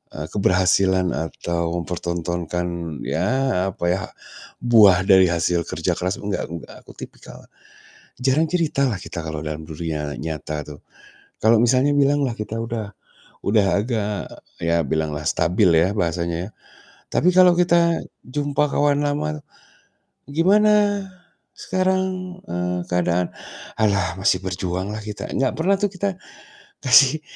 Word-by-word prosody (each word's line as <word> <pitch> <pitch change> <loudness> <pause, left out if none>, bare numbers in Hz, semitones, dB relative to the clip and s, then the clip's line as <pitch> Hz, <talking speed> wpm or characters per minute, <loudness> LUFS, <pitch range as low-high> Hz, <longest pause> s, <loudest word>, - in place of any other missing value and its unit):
eee, 75 +1 -5
keberhasilan 95 -1 +2
atau 85 +2 -3
mempertontonkan 85 -1 -4
ya 130 -8 0
apa 85 - -4
ya, 95 - 0 0.6
buah 105 -6 +6
dari 95 -2 +6
hasil 85 0 0
kerja - - -1
keras, 90 +1 -1
gak 100 -1 -2 0.2
gak, - - -13
aku - - -12
tipikal, - - -11 0.8
jarang 135 +5 +2
cerita 160 -5 +1
lah 110 - -2
kita 85 - -7
kalau 80 -1 -4
dalam 75 +1 -5
dunia 75 -2 -4
nyata 75 -1 -4
tuh. 75 -1 -10 0.6
Kalau 110 0 +5
misalnya 130 +4 +3
bilang 145 +1 +3
lah 120 - -2
kita 105 +1 -5
udah 115 -3 -4 0.5
udah 100 -1 +3
agak 105 -2 -2 0.3
ya 85 0 +1
bilanglah 75 0 -2
stabil 90 +3 +2
ya 85 +4 +3
bahasanya. 85 +1 -2 0.6
Tapi 175 - +2
kalau 180 -1 +7
kita 170 -1 +3 0.2
jumpa 145 +2 0
kawan 145 0 +2
lama, 150 +1 -2 0.9
"Gimana 205 +4 +3 0.5
sekarang, 185 -1 -1
eee, 90 +1 -2
keadaan?" 90 0 0 0.5
"Halah 100 -5 +1
masih 95 -1 +2
berjuang 95 +1 -3
lah 110 - -6
kita," 105 0 -6
gak 130 -1 +1
pernah 195 +4 +3
tuh 205 -2 0
kita 195 0 -2 0.7
kasih 135 +5 +6
100 Hz, 125 wpm, -22 LUFS, 85-145 Hz, 0.9 s, kalau